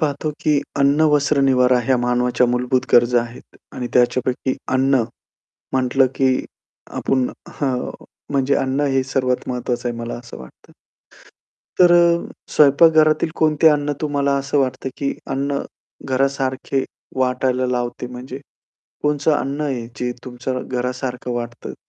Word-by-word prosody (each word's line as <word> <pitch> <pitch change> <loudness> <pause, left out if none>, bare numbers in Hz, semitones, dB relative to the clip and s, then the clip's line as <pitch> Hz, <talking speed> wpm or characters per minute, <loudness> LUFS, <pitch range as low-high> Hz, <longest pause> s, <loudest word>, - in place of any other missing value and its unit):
पाहतो 150 0 -1
की 150 -2 +2 0.2
अन्न, 140 +2 +3
वस्त्र, 145 0 +2
निवारा 125 -1 +4
ह्या 130 +2 +2
मानवाच्या 125 0 +1
मूलभूत 125 +1 +1
गरजा 120 0 +5
आहेत 120 +1 -10 0.2
आणि 125 - -4
त्याच्यापैकी 130 +1 +1 0.2
अन्न 135 -1 +3 0.7
म्हटलं, 130 +1 +3
की 130 -1 +1 0.5
आपण 130 -2 +1 0.3
हं, 130 -3 -1 0.4
म्हणजे 140 0 +2
अन्न 135 +2 0
हे 135 - +2
सर्वात 130 -1 -1
महत्वाचं 125 -1 -2
आहे 120 - -5
मला 115 0 -4
असं 120 0 -11
वाटतं. 65 - -15 1.1
तर 180 -1 +7
अ, 170 -1 +4 0.3
स्वयंपाकघरातील 155 +2 +5
कोणते 155 0 +4
अन्न 145 -1 +1
तुम्हाला 140 -2 0
असं 140 +1 -1
वाटतं 130 -1 -1
की 140 -1 -1 0.2
अन्न 140 +1 -1 0.5
घरासारखे 135 0 0 0.3
वाटायला 130 0 +1
लावते 125 0 -2
म्हणजे? 125 +2 -8 0.6
कोणतं 150 +1 +1
अन्न 140 +2 -3
आहे, 130 -6 -2
जे 125 0 -1
तुमच्या 125 +1 -4
घरासारखं 125 0 -4
वाटतं 120 -1 -5
130 Hz, 130 wpm, -20 LUFS, 125-140 Hz, 1.1 s, तर